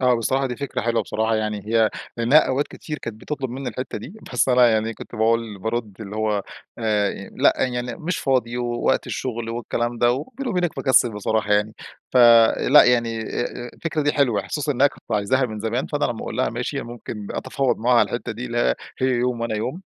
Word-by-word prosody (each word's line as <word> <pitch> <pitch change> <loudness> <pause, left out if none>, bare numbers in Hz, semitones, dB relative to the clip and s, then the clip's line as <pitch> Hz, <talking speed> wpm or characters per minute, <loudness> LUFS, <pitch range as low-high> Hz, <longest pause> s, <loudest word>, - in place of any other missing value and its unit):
آه 125 -1 +4
بصراحة 130 +4 0
دي 125 - -4
فكرة 140 +1 -3
حلوة 115 0 0
بصراحة. 110 0 0
يعني 105 -2 -3
هي 110 0 +3 0.3
لأنها 120 +6 +5
أوقات 135 +3 0
كتير 150 -2 -7
كانت 110 0 -7
بتطلب 135 -3 -4
مِنّي 130 +1 -4
الحتّة 130 - -5
دي. 175 - -10 0.2
بس 125 - +2
أنا 125 -1 +6
يعني 110 0 0
كنت - - -11
باقول 115 -2 0
بارُد 110 -1 -4
اللي 105 -1 -7
هو 105 -2 0 0.4
آآ، 105 -3 -1
لا - - +5
يعني 125 -1 -2
مش 170 +2 -3
فاضي، 125 -3 0
ووقت 120 -1 0
الشغل، 120 -3 -4
والكلام 120 0 -2
ده، 120 0 +4
وبيني 225 - -4
وبينك 180 -4 -1
مكسل 130 -3 +4
بصراحة 105 0 0
يعني. 105 +2 +1 0.4
فـلأ، 120 +3 +6
يعني 115 -2 +2
آآ 120 +2 -4
الفكرة 160 -2 -2
دي 145 0 +2
حلوة. 120 -9 +1
خصوصًا 150 -1 -1
إنّها 135 +3 +4
كانت 120 - -7
عايزاها 115 +6 +2
من 110 -2 -6
زمان، 115 +4 -1
فأنا 145 0 -1
لمّا 120 - -2
أقول - - -5
لها - - +1
ماشي، - - -3
ممكن 115 -3 -8
أتفاوض 130 0 -1
معاها 120 +1 +3
على - - +4
الحتّة 120 -1 -4
دي، 120 +4 -6
اللي 120 0 +1 0.3
هي 130 - +2
يوم 125 -1 0
وأنا 115 -1 -2
يوم. 130 - -4
120 Hz, 200 wpm, -22 LUFS, 110-130 Hz, 0.4 s, أنا